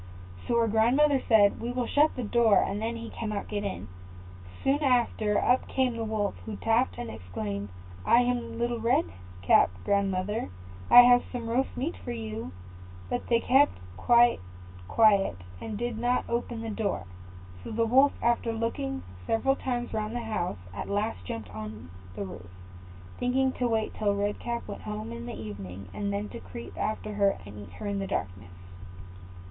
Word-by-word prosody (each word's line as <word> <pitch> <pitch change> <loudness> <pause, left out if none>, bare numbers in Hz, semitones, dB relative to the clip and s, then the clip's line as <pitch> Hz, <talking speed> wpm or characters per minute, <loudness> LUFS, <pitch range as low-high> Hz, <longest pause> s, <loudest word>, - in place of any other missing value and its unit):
So 235 - +2
her 230 -1 +3
grandmother 255 +6 +3
said, 205 -3 +5
"We 235 +1 -2
will 250 -1 -1
shut 295 +5 +3
the 250 - -3
door, 225 -1 +4
and 205 +2 -3
then 230 +1 -2
he 230 0 -7
cannot 215 -3 -4
get 205 -1 -3
in." 200 -2 -4 0.8
Soon 280 +2 +2
after, 235 -6 +2
up 250 +1 +2
came 255 -3 0
the 230 - -3
Wolf, 215 -2 -1
who 220 - -5
tapped, 225 +5 +1
and 240 - -5
exclaimed, 100 +3 -5 0.3
"I 235 - +5
am 245 -1 -1
Little 235 0 -1
Red 230 - +2 0.4
Cap, 85 - +5 0.2
grandmother; 200 - 0 0.4
I 245 - +11
have 245 0 +6
some 240 -2 -4
roast 250 +4 -1
meat 290 +7 -2
for - - -4
you." 110 -5 -5 0.6
But - - -2
they 235 -1 +3
kept 275 +3 +4 0.2
quite 240 - +4 0.5
quiet, 200 - +4 0.2
and 215 -2 -5
did 240 0 -3
not 245 +1 +1
open 235 -1 -2
the 225 -1 -4
door; 205 - -2 0.6
so - - -7
the 230 +1 +1
Wolf, 265 +5 +5
after 235 0 +2
looking 155 - -3 0.2
several 270 +4 +2
times 245 -3 -3
round 215 +1 -2
the 240 - -2
house, 215 -6 -2 0.2
at 100 - -5
last 200 - -2
jumped 105 0 -6
on 105 -4 -8 0.2
the 100 0 -4
roof, 90 -1 -9 0.7
thinking 260 +1 +2
to 250 -1 -1
wait 220 -2 0
till 205 -2 0
Red 205 +1 -1
Cap 235 0 -4
went 100 - -7
home 105 +3 -5
in 115 0 -7
the 105 - -6
evening, 100 -3 -8
and 200 -1 -2
then 200 +1 -2
to - - -8
creep 90 +6 -9
after 215 0 -3
her 200 -1 +2
and 100 0 -10
eat 100 -3 -11
her 90 - -8
in 200 -1 -1
the 195 - -3
darkness. 90 - -4
220 Hz, 180 wpm, -28 LUFS, -, 0.8 s, I